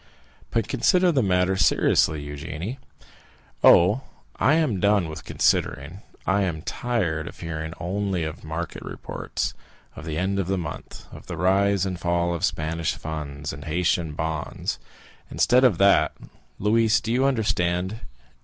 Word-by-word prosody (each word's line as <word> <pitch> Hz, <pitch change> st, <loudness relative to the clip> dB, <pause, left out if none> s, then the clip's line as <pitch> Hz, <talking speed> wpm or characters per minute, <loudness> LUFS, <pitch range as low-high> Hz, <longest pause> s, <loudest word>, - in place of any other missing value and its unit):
"But -, -, 0 dB
consider 180 Hz, -2 st, +3 dB
the 140 Hz, -5 st, +2 dB
matter 95 Hz, -2 st, +2 dB
seriously, 80 Hz, -6 st, +2 dB
Eugénie!" 80 Hz, -, -6 dB, 0.9 s
"Oh, 100 Hz, +9 st, +6 dB, 0.4 s
I 145 Hz, -, +4 dB
am 150 Hz, -, +1 dB
done 100 Hz, -2 st, +3 dB
with 80 Hz, -, -8 dB
considering! 80 Hz, +8 st, 0 dB, 0.2 s
I 95 Hz, +1 st, +2 dB
am 85 Hz, -5 st, -2 dB
tired 90 Hz, -12 st, -2 dB
of -, -, -10 dB
hearing 80 Hz, -1 st, -5 dB
only 95 Hz, 0 st, -1 dB
of 80 Hz, -1 st, -6 dB
market 80 Hz, +1 st, -5 dB
reports, -, -, -4 dB, 0.4 s
of -, -, -9 dB
the 80 Hz, -2 st, -3 dB
end 95 Hz, +3 st, 0 dB
of 95 Hz, -, -1 dB
the 95 Hz, 0 st, 0 dB
month, 85 Hz, -, -7 dB
of -, -, -12 dB
the 85 Hz, -, -5 dB
rise 100 Hz, +2 st, +2 dB
and 90 Hz, -2 st, -3 dB
fall 85 Hz, 0 st, 0 dB
of 85 Hz, +1 st, -4 dB
Spanish 80 Hz, -1 st, -1 dB
funds, 75 Hz, -2 st, -5 dB
of 70 Hz, 0 st, -9 dB
Haitian 85 Hz, 0 st, 0 dB
bonds. 80 Hz, 0 st, -3 dB, 0.5 s
Instead 125 Hz, +2 st, +3 dB
of 120 Hz, -9 st, +4 dB
that, 100 Hz, -5 st, +4 dB, 0.4 s
Louise—do 110 Hz, +1 st, +2 dB
you 130 Hz, +2 st, +2 dB
understand? 95 Hz, -5 st, 0 dB
90 Hz, 145 wpm, -24 LUFS, 80-100 Hz, 0.9 s, Oh